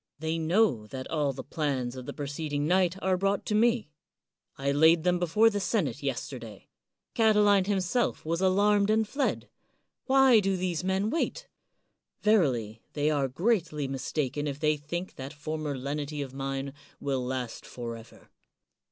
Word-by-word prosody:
' -, -, -63 dB
They 165 Hz, +1 st, 0 dB
know 160 Hz, -, +2 dB
that 130 Hz, +2 st, -6 dB
all 150 Hz, -3 st, +1 dB
the 135 Hz, -, -7 dB
plans 135 Hz, -5 st, -2 dB
of 130 Hz, -1 st, -8 dB
the -, -, -3 dB
preceding 145 Hz, 0 st, -3 dB
night 180 Hz, +1 st, +2 dB
are 185 Hz, 0 st, +2 dB
brought 195 Hz, +1 st, 0 dB
to -, -, -2 dB
me. 230 Hz, -4 st, +2 dB, 0.7 s
I 140 Hz, +1 st, 0 dB
laid 160 Hz, +3 st, +5 dB
them 180 Hz, 0 st, +2 dB
before 210 Hz, +7 st, +4 dB
the 205 Hz, -, -1 dB
senate 175 Hz, -, -1 dB
yesterday, 125 Hz, -5 st, -5 dB, 0.4 s
Catiline 210 Hz, -3 st, +4 dB
him 200 Hz, -2 st, +1 dB
self 210 Hz, +3 st, -1 dB
was 165 Hz, +2 st, -1 dB
alarmed 200 Hz, +2 st, +3 dB
and 220 Hz, 0 st, +2 dB
fled. 275 Hz, +5 st, -1 dB, 0.6 s
Why 265 Hz, -3 st, +6 dB
do 195 Hz, -2 st, 0 dB
these 180 Hz, -2 st, -2 dB
men 190 Hz, +3 st, 0 dB
116 -, -, -2 dB
CICERO -, -, -53 dB
wait? -, -, -47 dB, 0.2 s
Verily, 115 Hz, -7 st, -2 dB
they 150 Hz, +1 st, +1 dB
are 140 Hz, -3 st, +1 dB
greatly 165 Hz, -, 0 dB
mistaken 135 Hz, +2 st, -2 dB
if 140 Hz, 0 st, -4 dB
they 155 Hz, 0 st, +2 dB
think 170 Hz, +5 st, -6 dB
that 135 Hz, +2 st, -7 dB
former 150 Hz, -1 st, -4 dB
lenity 145 Hz, +2 st, -3 dB
of 135 Hz, -2 st, -9 dB
mine 135 Hz, 0 st, -4 dB, 0.3 s
will 135 Hz, -2 st, -1 dB
last 125 Hz, -2 st, -4 dB
forever. 115 Hz, -2 st, -9 dB
155 Hz, 165 wpm, -28 LUFS, 135-195 Hz, 0.7 s, Why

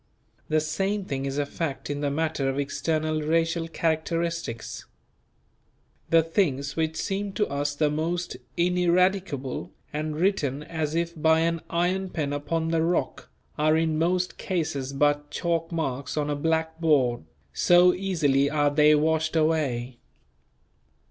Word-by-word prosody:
The 155 Hz, 0 st, +3 dB
same 195 Hz, +6 st, -1 dB
thing 135 Hz, -4 st, -3 dB
is 135 Hz, +1 st, -3 dB
a 145 Hz, -, +1 dB
fact 140 Hz, -1 st, -4 dB
in 145 Hz, 0 st, -3 dB
the 145 Hz, -, +1 dB
matter 155 Hz, -2 st, -1 dB
of 135 Hz, -, -2 dB
external 155 Hz, +2 st, -1 dB
racial 165 Hz, +2 st, +1 dB
characteristics. 165 Hz, -5 st, -2 dB, 1.2 s
The 165 Hz, -1 st, +5 dB
things 140 Hz, -5 st, 0 dB
which 160 Hz, -1 st, -1 dB
seem 195 Hz, +2 st, -2 dB
to 210 Hz, +2 st, +1 dB
us 145 Hz, +1 st, -2 dB
the 150 Hz, 0 st, +1 dB
most 170 Hz, +3 st, -2 dB, 0.2 s
ineradicable 180 Hz, -5 st, +1 dB, 0.2 s
and 155 Hz, 0 st, -2 dB
written 150 Hz, -6 st, 0 dB
as 155 Hz, -1 st, -3 dB
if 170 Hz, 0 st, -1 dB
by 160 Hz, 0 st, +4 dB
an 165 Hz, 0 st, 0 dB
"iron 185 Hz, +3 st, 0 dB
pen 145 Hz, -5 st, -2 dB
upon 160 Hz, +3 st, -1 dB
the 165 Hz, -1 st, +1 dB
rock" 170 Hz, +2 st, -1 dB, 0.3 s
are 155 Hz, +1 st, +4 dB
in 160 Hz, -1 st, +1 dB
most 180 Hz, +2 st, 0 dB
cases 150 Hz, -7 st, -2 dB
but 145 Hz, +1 st, +1 dB
chalk 165 Hz, +1 st, -1 dB
marks 140 Hz, -4 st, -3 dB
on 150 Hz, 0 st, 0 dB
a -, -, 0 dB
blackboard, 160 Hz, -, +1 dB, 0.3 s
so 180 Hz, -, +5 dB
easily 150 Hz, -8 st, +1 dB
are 145 Hz, -1 st, +2 dB
they 150 Hz, +1 st, +5 dB
washed 160 Hz, +1 st, +1 dB
away. 135 Hz, -7 st, 0 dB
160 Hz, 140 wpm, -26 LUFS, 145-170 Hz, 1.2 s, The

